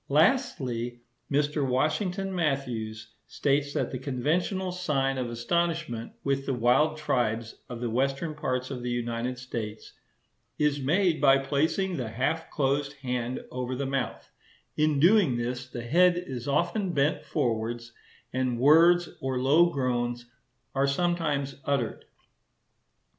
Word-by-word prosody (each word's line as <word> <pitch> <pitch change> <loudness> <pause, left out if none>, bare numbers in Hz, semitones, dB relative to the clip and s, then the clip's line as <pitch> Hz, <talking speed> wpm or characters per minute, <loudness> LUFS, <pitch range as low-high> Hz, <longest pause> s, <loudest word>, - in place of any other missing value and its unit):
Lastly, 140 - +1 0.3
Mr. 145 +1 +1
Washington 175 +9 0
Matthews 125 -10 -2
states 140 0 0
that - - 0
the 130 - -4
conventional 165 +8 -1
sign 135 -7 0
of 125 -2 -2
astonishment 155 -1 -1
with 135 0 -1
the 135 - 0
wild 130 +7 +3
tribes 115 -6 -1
of 120 -1 -6
the 120 - -1
western 135 +6 0
parts 130 -3 -2
of 125 -2 -4
the 125 - -3
United 120 +1 -2
States 115 -4 -6 0.6
"is 150 -1 +1
made 165 +3 +2
by 135 -2 +6
placing 160 +7 0
the 120 -4 -3
half 135 +8 -1
closed 140 0 0
hand 125 -1 -2
over 125 0 -3
the 140 +2 -2
mouth; 135 -1 -3 0.4
in 150 -2 +2
doing 175 - +5
this, 125 +1 -3
the 120 -1 -6
head 175 +8 +4
is 130 -9 -5
often 175 +6 0
bent 140 +1 +1
forwards, 120 -3 -2 0.4
and 130 -2 0
words 170 +6 +6
or 130 -1 -2
low 150 +7 +5
groans 120 -4 -1 0.5
are 135 0 +2
sometimes 150 -3 0
uttered." 140 -5 -1
135 Hz, 130 wpm, -28 LUFS, 125-155 Hz, 0.6 s, by